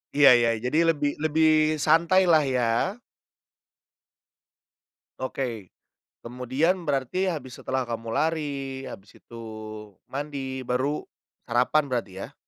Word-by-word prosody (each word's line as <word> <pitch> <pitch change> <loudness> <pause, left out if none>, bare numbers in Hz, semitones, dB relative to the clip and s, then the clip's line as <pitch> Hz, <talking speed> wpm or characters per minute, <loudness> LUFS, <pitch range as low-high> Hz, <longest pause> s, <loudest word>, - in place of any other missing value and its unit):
Iya 145 -1 +8
iya. 120 -1 +3
Jadi 125 +6 -1
lebih 150 -3 +1
lebih 155 0 +3
santailah 165 +1 +4
ya. 130 -3 0 2.5
Oke, 125 -6 -4 0.6
kemudian 130 +9 0
berarti 145 +6 0
habis 130 -6 -6
setelah 130 -1 -2
kamu 115 -1 -5
lari 140 -2 -2
habis 100 +1 -11
itu 115 -1 -11 0.7
mandi 135 -2 -4
baru 130 +4 0 0.5
sarapan 125 +6 +2
berarti 120 -6 -2 0.2
ya? - - -20
140 Hz, 100 wpm, -26 LUFS, 125-155 Hz, 2.5 s, Iya